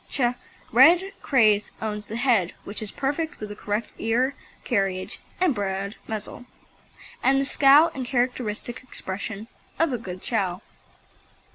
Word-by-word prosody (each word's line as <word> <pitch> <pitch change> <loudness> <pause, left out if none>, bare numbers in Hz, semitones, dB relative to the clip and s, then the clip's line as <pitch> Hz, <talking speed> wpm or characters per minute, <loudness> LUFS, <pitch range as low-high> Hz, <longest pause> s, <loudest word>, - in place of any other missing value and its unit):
Ch. 280 - -1 0.5
Red 365 +4 +6
Craze 215 -6 +3
owns 210 -1 -4
the 220 - -5
head 230 -8 +2
which 205 +2 -6
is 215 - -5
perfect 295 +4 -2
with 215 - -6
the 205 - -7
correct 210 +2 -3
ear 245 +5 +1 0.3
carriage 195 -4 -1 0.2
and 360 -5 +3
broad 200 -1 -3
muzzle, 220 +3 -6 0.8
and 270 +1 +4
the 275 - +1
scowl 290 +4 +6
and 265 - -4
characteristic 245 -2 -2
expression 205 -3 -6 0.3
of 325 -4 +2
a 245 - -1
good 185 -4 -8
Chow. 195 -5 -1
225 Hz, 140 wpm, -25 LUFS, 205-270 Hz, 0.8 s, Red